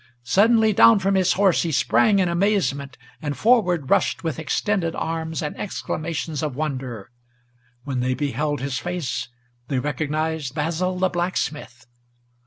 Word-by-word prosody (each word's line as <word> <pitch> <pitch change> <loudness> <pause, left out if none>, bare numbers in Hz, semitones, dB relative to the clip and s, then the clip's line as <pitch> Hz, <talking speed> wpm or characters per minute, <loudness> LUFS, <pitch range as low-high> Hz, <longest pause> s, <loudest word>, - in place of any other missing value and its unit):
Suddenly 220 - +4
down 225 +3 +7
from 195 0 +1
his 190 -2 +3
horse 195 -2 +3
he 165 - -1
sprang 130 - +3
in 190 -2 +2
amazement, 170 -8 0 0.2
and 145 -3 -3
forward 180 - +2
Rushed - - +2
with 160 -2 -3
extended 170 +1 -1
arms 160 0 -3
and 150 - -4
exclamations 165 -5 -4
of 150 -5 -3
wonder; 130 -7 -4 0.7
When 135 -2 -3
they 130 +1 0
beheld 145 +1 -2
his 135 -1 -2
face, 175 -10 -3 0.4
they 135 - -1
recognized 150 0 -2
Basil 170 +4 -1
the 185 0 +2
blacksmith. 155 -8 -3
160 Hz, 140 wpm, -23 LUFS, 140-185 Hz, 0.7 s, down